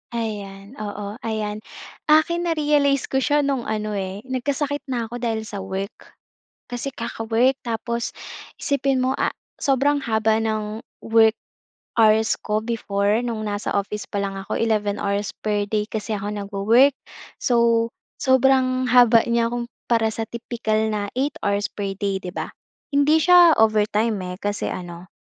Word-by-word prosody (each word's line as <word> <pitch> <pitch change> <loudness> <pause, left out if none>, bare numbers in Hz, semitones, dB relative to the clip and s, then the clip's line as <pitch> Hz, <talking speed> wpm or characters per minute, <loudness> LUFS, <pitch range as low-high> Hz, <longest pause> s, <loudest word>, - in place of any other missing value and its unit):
Ayan, 205 -2 -5
oo, 205 +1 -5
ayan. 215 -2 -3 0.5
Akin 340 +3 +3
na-realize 295 -4 +2
ko 265 - +2
siya 290 +2 +2
no'ng 275 -4 -1
ano, 215 -1 -2
eh, 195 0 -4
nagkasakit 280 +3 -2
na 245 -3 -1
ako 240 +2 -6
dahil 225 -2 -1
sa 205 -2 -6
work. 195 +1 -6 0.6
Kasi 245 +3 -3
kaka-work 235 +3 0
tapos, 235 0 -3 0.5
isipin 275 -2 +1
mo, 260 - +2
ah, - - 0 0.2
sobrang 285 +1 +2
haba 220 -1 +2
ng 215 -1 -2 0.2
work 225 0 +4 0.6
hours 220 0 +4
ko 210 0 -1
before 210 -2 0
no'ng 230 -3 -3
nasa 205 0 -3
office 205 +1 -2
pa 200 - -3
lang 195 0 -3
ako 195 - -5
11 210 -2 0
hours 200 0 -1
per 205 -1 0
day 210 -1 +1
kasi 215 0 -3
ako 205 0 -4
nagwo-work. 210 +6 +3 0.4
So, 235 -1 +3 0.3
sobrang 260 -1 +3
haba 240 -2 +6
niya 235 0 +1
kung 240 0 -3 0.2
para 225 -1 +3
sa 225 - -3
tipikal 220 -2 -1
na 205 -1 -2
8 280 +1 0
hours 200 0 +1
per 200 -1 -4
day, 195 -1 -1
'di 180 - -5
ba? - - -3 0.5
Hindi 295 +3 +4
siya 350 -2 +7
overtime, 215 0 +3 0.2
eh, - - -16
kasi 205 0 -2
ano, 175 0 -7
225 Hz, 150 wpm, -22 LUFS, 210-255 Hz, 0.6 s, siya